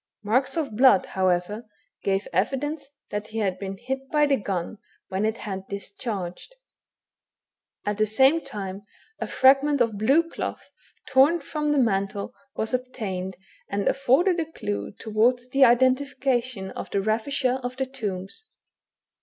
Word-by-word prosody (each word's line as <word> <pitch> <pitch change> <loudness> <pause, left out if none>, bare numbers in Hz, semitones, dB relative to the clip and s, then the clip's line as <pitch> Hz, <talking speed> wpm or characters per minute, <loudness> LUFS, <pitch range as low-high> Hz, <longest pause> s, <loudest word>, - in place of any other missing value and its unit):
Marks 255 +9 +1
of 280 -9 -2
blood, 250 -5 +6
however, 185 +4 0 0.4
gave 195 0 0
evidence 270 - -1 0.2
that 210 +1 -3
he 220 - -7
had 190 -4 0
been 195 -1 -5
hit 265 +4 -5
by 300 -1 +3
the 285 -1 +3
gun 195 -2 -3 0.3
when 190 +3 0
it 220 +1 0
had 195 -2 -6
discharged. 200 - -6 1.3
At 205 0 -2
the 215 - +3
same 265 +9 +4
time, 195 -1 -6 0.4
a - - -3
fragment 275 +2 +4
of 225 -4 +1
blue 280 +10 +4
cloth, - - -6 0.4
torn 275 +6 +5
from 300 0 -2
the 295 - +2
mantle, 200 -4 0 0.2
was 220 +3 -2
obtained, 210 -8 -3 0.3
and 200 0 -1
afforded 315 +8 +3
a 320 -1 -3
clue 100 - -4
towards 240 +3 +1
the 270 +1 +6
identification 255 -3 +2
of - - -7
the 200 - 0
ravisher 255 +4 0
of 250 +1 -5
the 265 - 0
tombs. 210 - -5
235 Hz, 145 wpm, -25 LUFS, 200-270 Hz, 1.3 s, blood